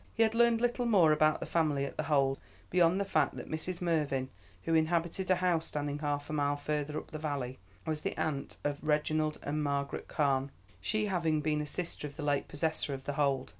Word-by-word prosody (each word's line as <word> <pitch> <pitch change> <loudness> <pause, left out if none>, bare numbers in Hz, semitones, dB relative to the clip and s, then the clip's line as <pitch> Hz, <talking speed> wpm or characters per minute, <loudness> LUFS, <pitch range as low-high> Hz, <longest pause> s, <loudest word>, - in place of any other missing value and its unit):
He 225 - +5
had 220 0 +2
learned 235 0 +4
little 245 0 +1
more 185 -9 +6
about 155 0 +3
the - - -2
family 150 -4 +1
at - - -6
The - - -2
Hold, 135 -2 +3 0.3
beyond 180 +1 +4
the 200 - 0
fact 195 - +1
that - - -7
Mrs. 170 +3 -4
Mervyn, 145 -6 0 0.3
who 165 - 0
inhabited 170 +3 +1
a 185 - +6
house 175 -3 +1
standing 145 0 -3
half 145 -1 -2
a - - -5
mile 145 -1 +1
further 150 0 -2
up - - -7
the 155 - -5
valley, 140 -4 -3 0.3
was 155 -2 -2
the - - -3
aunt 145 -3 -2
of 145 0 -1
Reginald 155 0 +1
and 150 +2 -1
Margaret 140 -1 -2
Carne, 140 -3 +1 0.3
she 215 0 0
having 170 -6 +1
been 150 0 +1
a 150 - -4
sister 165 -1 -4
of 145 - -12
the 150 - -6
late 145 -1 +1
possessor 155 -1 -1
of 135 - -9
The 145 - -3
Hold. 140 -2 +1
155 Hz, 215 wpm, -32 LUFS, 145-170 Hz, 0.3 s, more